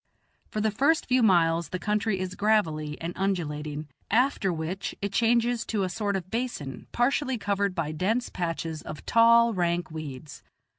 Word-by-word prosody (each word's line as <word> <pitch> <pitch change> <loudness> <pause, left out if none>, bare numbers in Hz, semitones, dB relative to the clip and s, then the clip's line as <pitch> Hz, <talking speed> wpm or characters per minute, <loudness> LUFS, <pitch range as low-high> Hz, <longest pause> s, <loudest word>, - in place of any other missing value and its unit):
For 215 - -2
the 215 0 +1
first 285 +9 +2
few 255 0 +3
miles 170 -5 +3
the 185 - -3
country 210 +1 0
is 185 0 -3
gravelly 160 -9 +1
and 170 +2 -4
undulating, 155 -6 -2 0.2
after 235 -4 +2
which 170 +4 -4
it 200 0 -3
changes 235 +1 +2
to 210 -3 0
a 185 - -1
sort 205 +1 -1
of 185 -1 -5
basin, 225 - -4
partially 265 +1 +1
covered 200 -2 -1
by 160 -3 -1
dense 210 +10 0
patches 165 -3 -3
of 150 - -9
tall, 235 0 +5
rank 175 -3 0
weeds. 150 -2 -8
195 Hz, 160 wpm, -27 LUFS, 165-225 Hz, 0.2 s, tall